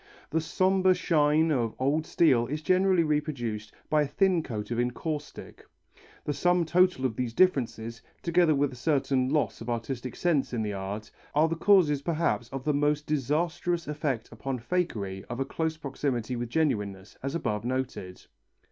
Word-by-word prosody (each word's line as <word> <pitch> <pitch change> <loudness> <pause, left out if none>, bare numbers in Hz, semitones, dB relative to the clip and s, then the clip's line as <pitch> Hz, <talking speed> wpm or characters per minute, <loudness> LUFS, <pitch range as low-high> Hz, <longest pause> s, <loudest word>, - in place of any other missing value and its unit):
The 160 - +1
sombre 185 +3 +3
shine 155 -2 +3
of 120 -6 0
old 145 +4 0
steel 125 -8 +3
is 150 +4 -4
generally 185 0 +3
reproduced 135 -9 -2 0.2
by 155 -1 +3
a 145 - +1
thin 180 +4 +2
coat 110 -6 -5
of 120 - -1
encaustic. 145 +5 -4 0.6
The 145 - 0
sum 175 +4 +2
total 180 -4 +3
of 120 -4 -1
these 120 -1 -3
differences, 115 -9 +1 0.2
together 170 -2 +3
with 140 -1 +1
a - - -9
certain 135 -1 +1
loss 150 -4 0
of 115 - -6
artistic 120 +2 -3
sense 155 -8 +1
in 115 -2 -1
the 105 -1 -2
art, 100 +2 -5 0.2
are 155 +2 +5
the 165 - -1
causes 165 -6 +4
perhaps 160 -6 0
of 135 -1 -5
the 150 0 +1
disastrous 160 +4 -1
effect 145 -6 -2
upon 135 -1 -4
fakery 110 - -2
of 120 - -6
a 135 - 0
close 160 +1 -2
proximity 130 -4 -2
with 120 -1 -4
genuineness, 105 -10 -1
as 135 +3 -3
above 105 -10 -2
noted. 125 -7 -4
145 Hz, 165 wpm, -28 LUFS, 120-160 Hz, 0.6 s, are